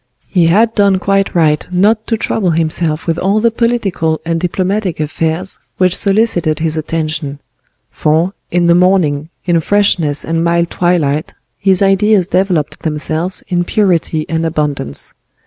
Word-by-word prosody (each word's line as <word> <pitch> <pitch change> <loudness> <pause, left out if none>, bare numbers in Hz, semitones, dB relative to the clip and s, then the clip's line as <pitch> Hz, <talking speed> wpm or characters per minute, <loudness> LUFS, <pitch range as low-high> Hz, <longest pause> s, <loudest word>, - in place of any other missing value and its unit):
He 175 -4 +2
had 220 +7 +3
done 200 -3 +3
quite 195 +1 0
right 155 -3 +2
not 210 +5 +2
to 225 - 0
trouble 210 -3 -1
himself 160 -1 0
with 165 0 -1
all 195 +3 +1
the 230 +1 +2
political 215 -9 0
and 165 0 -1
diplomatic 185 +1 -2
affairs 160 +4 -2 0.2
which 185 -1 +2
solicited 195 -7 +1
his 160 -1 -1
attention; 155 -2 -3 0.5
for, 160 +5 0 0.2
in 175 0 +1
the 170 - +5
morning, 170 -5 +2 0.2
in 175 -2 +2
freshness 170 -5 +1
and 165 0 -1
mild 170 0 +1
twilight, 160 -3 0 0.2
his 195 -1 +2
ideas 195 0 +3
developed 180 -5 -1
themselves 160 +3 -2
in 175 -1 0
purity 175 -5 0
and 165 0 -1
abundance. 150 - -2
175 Hz, 145 wpm, -14 LUFS, 160-195 Hz, 0.5 s, the